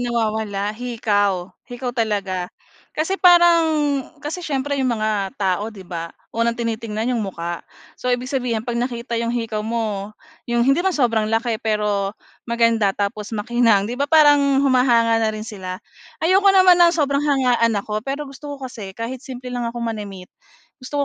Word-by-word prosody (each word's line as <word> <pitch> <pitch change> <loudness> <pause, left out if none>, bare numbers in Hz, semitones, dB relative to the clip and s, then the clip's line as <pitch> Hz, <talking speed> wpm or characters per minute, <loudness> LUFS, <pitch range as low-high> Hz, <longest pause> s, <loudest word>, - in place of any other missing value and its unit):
nawawala? 220 -4 -1
Hikaw. 205 -6 -1 0.2
Hikaw 245 0 -4
talaga. 200 -6 -1 0.5
Kasi 350 +6 -1
parang 345 -2 +6 0.6
kasi 320 +5 -4
siyempre 285 -3 -2
'yong 260 - +1
mga 210 -3 -1
tao, 200 +2 0
'di 200 -4 -11
ba? 170 -2 -5 0.2
Unang 230 0 0
tinitingnan 230 0 -2
'yong 235 - 0
mukha. 175 -4 -4 0.4
So 250 - -4
ibig 250 0 0
sabihin, 240 -4 -1
'pag 240 -1 -3
nakita 240 -1 -4
'yong 235 0 -1
hikaw 225 -2 -2
mo, 215 -2 -3 0.3
'yong 235 0 +2
hindi 275 +5 +3
man 375 -1 0
sobrang 230 -5 +2
laki 225 0 0
pero, 210 -2 -1 0.3
maganda, 230 -4 +2
tapos 210 +2 -3
makinang, 225 -2 +2
'di 245 +5 -5
ba 285 - +1
parang, 285 -3 +5
humahanga 235 -4 +3
na 220 - +2
rin 215 0 -4
sila. 190 -5 -6 0.5
Ayoko 385 +3 +4
naman 370 -2 +6
ng 340 -1 +7
sobrang 280 -2 +1
hangaan 250 -6 +2
ako, 210 +1 -2
pero 275 +5 -4
gusto 285 +1 -8
ko 270 - -9
kasi 210 -7 -8
kahit 235 +2 -5
simple 255 -2 -8
lang 240 -1 -2
ako 235 - -8
manamit, 205 -5 -6 0.5
gusto 285 +2 -2
230 Hz, 165 wpm, -21 LUFS, 210-265 Hz, 0.6 s, ng